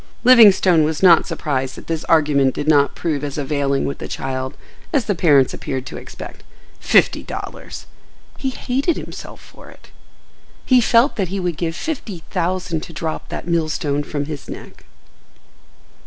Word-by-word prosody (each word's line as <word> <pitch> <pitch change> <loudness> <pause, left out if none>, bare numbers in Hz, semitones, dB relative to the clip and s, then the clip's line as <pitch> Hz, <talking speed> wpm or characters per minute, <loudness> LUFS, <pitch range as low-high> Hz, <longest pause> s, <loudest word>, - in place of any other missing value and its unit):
Livingstone 200 -9 +7
was 155 +3 -2
not 170 -3 +6
surprised 130 -3 -2
that - - -11
this 165 -1 -3
argument 145 -5 +3
did 145 - -4
not 145 -2 +3
prove 150 -4 -2
as 145 0 -4
availing 140 -1 -1
with 140 - -4
the - - -6
child 130 +1 -4 0.3
as 280 - +1
the 205 - +1
parents 145 -7 +3
appeared 130 -2 -4
to - - -8
expect.—Fifty - - -2
dollars! - - -8 0.5
He 270 - -1
hated 270 +5 -1
himself - - -9
for - - -15
it. - - -18 0.7
He 255 -2 +5
felt 235 +4 +3
that 195 -3 0
he 195 +3 -4
would 175 -3 -2
give 165 0 -3
fifty 210 - -5
thousand 180 -2 -1
to 165 - -10
drop 160 -1 -5
that - - -6
millstone 155 -4 0
from 145 0 -4
his 150 -2 -8
neck. - - -10
160 Hz, 155 wpm, -20 LUFS, 145-185 Hz, 0.7 s, Livingstone